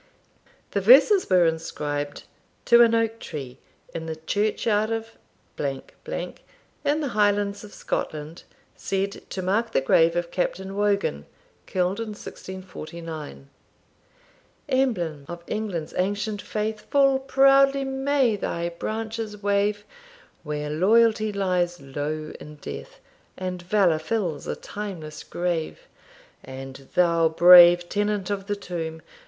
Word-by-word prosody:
The -, -, 0 dB
verses 425 Hz, -5 st, +6 dB
were 180 Hz, -2 st, +5 dB
inscribed, 145 Hz, -3 st, -3 dB, 0.4 s
To 235 Hz, 0 st, +7 dB
an 230 Hz, -1 st, +5 dB
Oak 225 Hz, 0 st, 0 dB
Tree 135 Hz, -4 st, -7 dB, 0.3 s
In 160 Hz, 0 st, -5 dB
the 160 Hz, -, -3 dB
Church 205 Hz, +7 st, -1 dB
Yard 215 Hz, -1 st, +2 dB
of, 225 Hz, 0 st, -3 dB, 0.5 s
in 135 Hz, -2 st, -4 dB, 0.9 s
the 295 Hz, 0 st, +1 dB
Highlands 205 Hz, -2 st, +1 dB
of 210 Hz, -, -11 dB
Scotland, 155 Hz, -2 st, -4 dB, 0.3 s
said 195 Hz, +1 st, -3 dB
to 185 Hz, -, -4 dB
mark 220 Hz, +5 st, 0 dB
the -, -, +4 dB
Grave 165 Hz, +5 st, +3 dB
of 175 Hz, 0 st, -2 dB
Captain 190 Hz, +2 st, -2 dB
Wogan, 200 Hz, -, 0 dB, 0.4 s
killed 185 Hz, +2 st, 0 dB
in 225 Hz, -2 st, -4 dB
1649. 165 Hz, -7 st, -8 dB, 1.2 s
Emblem 180 Hz, -, 0 dB
of 175 Hz, 0 st, -8 dB
England's 195 Hz, -8 st, -4 dB
ancient 205 Hz, +2 st, -1 dB
faith, 215 Hz, 0 st, -4 dB
Full 275 Hz, -1 st, +4 dB
proudly 275 Hz, +1 st, +4 dB
may 270 Hz, -3 st, +1 dB
thy 170 Hz, -3 st, -3 dB
branches 220 Hz, +3 st, -5 dB
wave, 205 Hz, +1 st, +1 dB, 0.6 s
Where 150 Hz, -1 st, -4 dB
loyalty 215 Hz, +5 st, +3 dB
lies 180 Hz, -3 st, 0 dB
low 145 Hz, +3 st, -5 dB
in 150 Hz, 0 st, -11 dB
death, -, -, -9 dB, 0.4 s
And 185 Hz, -1 st, -4 dB
valour 180 Hz, -3 st, +2 dB
fills 170 Hz, -3 st, -2 dB
a -, -, -2 dB
timeless 185 Hz, -7 st, -7 dB
grave. 170 Hz, -2 st, -3 dB, 0.6 s
And 135 Hz, 0 st, -9 dB
thou, 170 Hz, -2 st, +4 dB
brave 175 Hz, +1 st, +8 dB
tenant 205 Hz, 0 st, -1 dB
of 195 Hz, -1 st, -3 dB
the 205 Hz, -, -1 dB
tomb! 165 Hz, -5 st, -6 dB
190 Hz, 120 wpm, -25 LUFS, 165-215 Hz, 1.2 s, brave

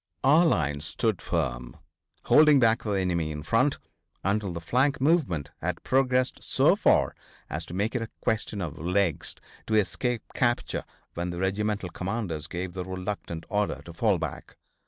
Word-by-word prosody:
Our 155 Hz, +6 st, +6 dB
line 75 Hz, -, +1 dB
stood 95 Hz, +6 st, -1 dB
firm, -, -, -2 dB, 0.5 s
holding 150 Hz, -2 st, +6 dB
back 115 Hz, -1 st, +4 dB
the 105 Hz, -, -2 dB
enemy 90 Hz, -5 st, 0 dB
in 75 Hz, -1 st, -6 dB
front 115 Hz, -, +2 dB, 0.5 s
until 100 Hz, 0 st, 0 dB
the 85 Hz, -, -4 dB
flank 130 Hz, -, +1 dB
movement 130 Hz, -, +1 dB
had 90 Hz, 0 st, -3 dB
progressed 130 Hz, -1 st, +2 dB
so -, -, +3 dB
far -, -, +3 dB, 0.4 s
as -, -, -4 dB
to 85 Hz, -, -7 dB
make 105 Hz, +4 st, 0 dB
it 125 Hz, -, -1 dB
a 115 Hz, -, -4 dB
question 110 Hz, -2 st, -1 dB
of 80 Hz, -2 st, -6 dB
legs 90 Hz, -1 st, 0 dB, 0.3 s
to 110 Hz, -, +1 dB
escape 110 Hz, +4 st, 0 dB
capture 120 Hz, -2 st, 0 dB, 0.3 s
when 85 Hz, +1 st, -3 dB
the 85 Hz, -, -5 dB
regimental 100 Hz, +1 st, -1 dB
commanders 90 Hz, -4 st, -3 dB
gave 90 Hz, +2 st, -4 dB
the 90 Hz, 0 st, -4 dB
reluctant 95 Hz, -3 st, -5 dB
order 105 Hz, -1 st, -1 dB
to 85 Hz, -, -9 dB
fall 100 Hz, +3 st, +2 dB
back. 80 Hz, -3 st, -6 dB
100 Hz, 160 wpm, -27 LUFS, 85-115 Hz, 0.5 s, Our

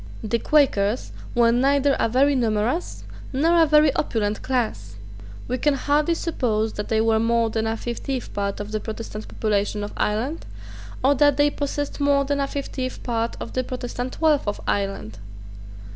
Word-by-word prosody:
The 230 Hz, +2 st, 0 dB
Quakers 245 Hz, -7 st, +2 dB, 0.2 s
were 235 Hz, -1 st, +5 dB
neither 275 Hz, +3 st, +3 dB
a -, -, +2 dB
very 275 Hz, +5 st, +3 dB
numerous 235 Hz, +5 st, -1 dB, 0.3 s
nor 330 Hz, +5 st, +3 dB
a 325 Hz, -, +5 dB
very 300 Hz, -1 st, +5 dB
opulent 215 Hz, -7 st, -1 dB
class. 165 Hz, -, -2 dB, 0.5 s
We 255 Hz, +1 st, -2 dB
can 295 Hz, +2 st, +2 dB
hardly 295 Hz, +4 st, +1 dB
suppose 225 Hz, -10 st, -1 dB
that 210 Hz, -, -4 dB
they 220 Hz, -, +1 dB
were 220 Hz, 0 st, +3 dB
more 230 Hz, 0 st, +2 dB
than 220 Hz, 0 st, -1 dB
a 225 Hz, 0 st, -1 dB
fiftieth 240 Hz, +3 st, -4 dB
part 200 Hz, -1 st, -2 dB
of 205 Hz, 0 st, -6 dB
the 215 Hz, -, -1 dB
Protestant 220 Hz, -1 st, -7 dB
population 205 Hz, -1 st, -1 dB
of 205 Hz, -, -6 dB
Ireland, 235 Hz, +10 st, -2 dB, 0.6 s
or 275 Hz, +2 st, +5 dB
that 290 Hz, 0 st, +3 dB
they 290 Hz, 0 st, +4 dB
possessed 290 Hz, 0 st, -3 dB
more 280 Hz, -1 st, +3 dB
than 285 Hz, 0 st, -1 dB
a 275 Hz, -, 0 dB
fiftieth 265 Hz, -2 st, -5 dB
part 230 Hz, -1 st, -2 dB
of -, -, -7 dB
the 255 Hz, -, 0 dB
Protestant 250 Hz, 0 st, -5 dB
wealth 305 Hz, -7 st, +3 dB
of 205 Hz, -, -2 dB
Ireland. 195 Hz, -, -2 dB
245 Hz, 170 wpm, -23 LUFS, 215-285 Hz, 0.6 s, were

